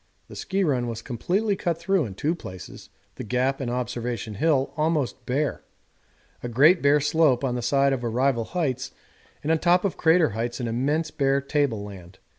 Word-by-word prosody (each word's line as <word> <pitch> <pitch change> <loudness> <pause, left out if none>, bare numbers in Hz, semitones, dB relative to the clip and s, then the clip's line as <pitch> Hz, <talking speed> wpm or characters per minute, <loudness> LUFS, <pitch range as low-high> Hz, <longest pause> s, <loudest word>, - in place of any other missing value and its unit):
The - - -10
ski 195 +1 -1
run 130 -7 0
was 115 -1 -5
completely 195 - -1
cut 170 -3 -2
through 170 -1 +1
in 100 -4 -8
two 150 - 0
places, 95 - -10 0.3
the - - -5
Gap 130 +5 0
and 125 - -2
Observation 120 -3 -3
Hill 140 +4 +1
almost 155 -4 -1
bare, 140 +3 -1 0.8
a 120 - -5
great 150 +10 +5
bare 145 +1 +4
slope 145 -3 +2
on 130 -2 0
the 125 - -2
side 135 +3 +2
of 125 -2 -3
Arrival 120 0 +1
Heights, 135 -7 -2 0.5
and 155 - 0
on 160 - +2
top 180 +3 +3
of 195 - -1
Crater 165 -1 +4
Heights 120 +3 -4
an 120 - -2
immense 145 +8 -1
bare 135 -1 +1
table 140 -6 -1
land. 95 -3 -11
135 Hz, 185 wpm, -25 LUFS, 120-160 Hz, 0.8 s, great